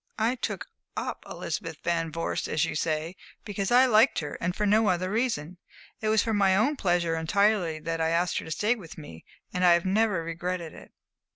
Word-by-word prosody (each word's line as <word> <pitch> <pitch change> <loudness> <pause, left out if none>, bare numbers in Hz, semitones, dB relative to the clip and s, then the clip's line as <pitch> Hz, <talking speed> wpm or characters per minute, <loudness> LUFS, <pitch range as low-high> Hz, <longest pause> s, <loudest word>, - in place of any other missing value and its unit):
I 225 +3 +2
'took 255 - -4 0.3
up' - - -4
Elizabeth - - -4
Van 165 -1 0
Vorst, 165 +1 -2
as 155 +1 +1
you - - -4
say, 155 +2 -2 0.3
because 200 -2 -2
I 250 +2 +6
liked 230 +1 +4
her, 150 -2 -3
and 180 +1 -1
for 210 - 0
no 215 +2 +4
other 185 0 0
reason. 195 -8 -1 0.4
It 215 - -1
was 215 -1 +3
for 225 - -1
my 195 -2 +4
own 230 +10 +2
pleasure 175 -7 +1
entirely 180 0 +1
that 165 +1 -2
I 160 - +2
asked 170 +1 +1
her - - -8
to - - -8
stay 210 +9 +1
with 190 -10 -10
me, 80 - -11 0.3
and 180 - -1
I 175 -1 +7
have 170 +1 +1
never 195 -2 +2
regretted 170 0 -4
it." - - -13
180 Hz, 205 wpm, -27 LUFS, 165-215 Hz, 0.4 s, I